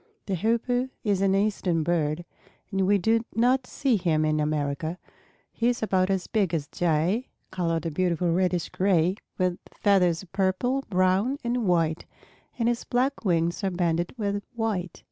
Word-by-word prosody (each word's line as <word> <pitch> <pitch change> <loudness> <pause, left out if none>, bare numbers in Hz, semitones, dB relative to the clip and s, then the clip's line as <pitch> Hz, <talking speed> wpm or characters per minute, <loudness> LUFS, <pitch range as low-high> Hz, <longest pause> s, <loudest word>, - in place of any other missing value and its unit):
The 195 - -2
Hoopoe 235 +6 0
is 200 -4 +1
an 195 0 +3
Eastern 195 -5 +1
bird 160 0 0 0.5
and 195 -1 +1
we 205 +1 +4
do 225 +4 +2
not 250 +3 +2
see 265 -6 +1
him 160 -4 +1
in 155 0 +1
America. 150 +2 -1 0.5
He 230 - 0
is 240 -2 -1
about 190 -3 +2
as 190 -2 0
big 195 -6 0
as 150 -3 -2
a - - -25
Jay, 175 - +1 0.2
colored 165 -3 -1
a 165 - -1
beautiful 175 +1 0
reddish 180 -1 +1
gray, 185 -1 +2 0.2
with 180 -1 0
feathers 185 -4 +2
of 185 - -17
purple, 195 +8 0
brown, 185 +8 +2
and 240 -2 -1
white, 165 -2 +1 0.5
and 230 -2 +1
his 240 0 0
black 255 +2 0
wings 170 -1 +1
are 195 - +2
banded 175 0 -1
with 205 -2 -1
white. 205 -7 -2
185 Hz, 165 wpm, -26 LUFS, 170-220 Hz, 0.5 s, we